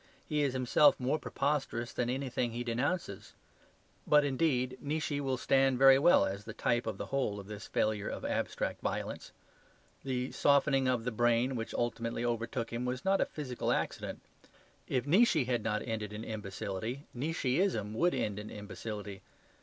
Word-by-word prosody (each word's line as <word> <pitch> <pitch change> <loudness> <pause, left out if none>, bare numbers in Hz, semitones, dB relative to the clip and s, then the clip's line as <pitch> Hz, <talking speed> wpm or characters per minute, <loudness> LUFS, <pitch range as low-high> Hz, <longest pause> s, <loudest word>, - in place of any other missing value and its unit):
He 150 -2 0
is 140 -3 +1
himself 130 +3 +4
more 135 +5 0
preposterous 135 -5 -2
than 120 -1 -1
anything 125 -2 -1
he 120 +1 -3
denounces. 120 - -2 0.7
But, 150 -1 +5
indeed, 130 -3 0
Nietzsche 145 0 -2
will 135 -2 -1
stand 135 0 +3
very 135 +1 +7
well 145 - +6
as 100 +1 -4
the 110 - -8
type 120 0 0
of - - -3
the - - -4
whole 130 -7 -1
of 100 - -9
this 105 0 -8
failure 105 -1 0
of - - -5
abstract - - -2
violence. - - -4 0.7
The 130 -1 -2
softening 140 -2 +3
of 125 -3 +1
the 125 - -2
brain 120 +3 +2
which 115 -1 -4
ultimately 115 0 -2
overtook 115 0 -2
him 120 +1 -2
was 125 +3 -3
not 195 0 +3
a - - +2
physical 130 -5 -3
accident. - - -2 0.7
If 130 -1 0
Nietzsche 180 - +4
had 120 -2 0
not 105 -1 -1
ended 105 -2 -3
in 105 +1 -6
imbecility, 110 +4 -5
Nietzscheism 135 - 0
would 175 +10 +2
end 105 -1 -2
in 105 +1 -7
imbecility. 105 -1 -7
125 Hz, 165 wpm, -32 LUFS, 115-140 Hz, 0.7 s, very